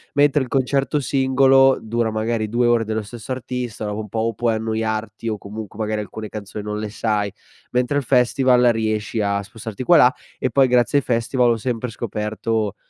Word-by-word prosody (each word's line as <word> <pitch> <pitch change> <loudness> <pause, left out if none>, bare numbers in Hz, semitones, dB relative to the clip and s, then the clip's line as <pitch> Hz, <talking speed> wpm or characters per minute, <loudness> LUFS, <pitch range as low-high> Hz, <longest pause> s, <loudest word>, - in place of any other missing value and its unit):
Mentre 145 0 +4
il 125 - -8
concerto 135 +2 +1
singolo 135 0 +4
dura 115 0 -1
magari 110 0 -1
2 120 +1 +2
ore 120 -1 +3
dello 110 0 -2
stesso 115 +4 -9
artista, 125 -3 -4
dopo 105 +1 -3
un 105 - -9
po' 110 - -3
o 115 +1 0
puoi 115 +1 0
annoiarti, 110 0 -3
o 105 - -2
comunque 105 +1 -9
magari 110 0 -1
alcune 110 +1 -7
canzoni 105 0 -7
non 105 0 -3
le 105 -1 -4
sai, 105 -2 -1 0.4
mentre 125 +3 +1
al 145 - 0
festival 125 0 +3
riesci 110 0 -1
a 100 0 0
spostarti 110 +3 -7
qua 175 - +5
e - - +7
là. 125 +1 +6 0.2
E 130 - -1
poi 135 +2 +4
grazie 125 +2 +3
ai - - -6
festival 120 +1 +1
ho 115 - +1
sempre 120 +1 -3
scoperto 110 -1 -2
115 Hz, 195 wpm, -21 LUFS, 110-125 Hz, 0.4 s, e